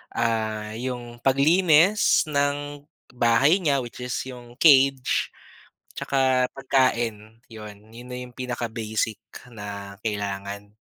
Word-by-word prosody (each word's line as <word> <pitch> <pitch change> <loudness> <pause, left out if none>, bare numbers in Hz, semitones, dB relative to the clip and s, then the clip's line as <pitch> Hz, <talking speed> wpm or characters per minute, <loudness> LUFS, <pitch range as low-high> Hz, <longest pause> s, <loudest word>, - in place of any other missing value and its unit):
ah, 110 -2 -1
'yung 120 -1 -6
paglinis 160 - +4
ng 145 -1 -2 0.2
bahay 125 +9 +3
niya 140 -7 +1
which 120 - -10
is 125 0 -4
'yung 125 -2 -11
cage, 135 -3 +4 0.7
'tsaka 130 -2 +1
pagkain 120 -5 -1
'yun, 105 -2 -10
'yun 120 +2 -12
na 125 0 -7
'yung 125 -1 -11
pinaka-basic 115 -3 -3 0.3
na 100 -3 -8
kailangan. 100 0 -4
125 Hz, 105 wpm, -24 LUFS, 110-135 Hz, 0.7 s, paglinis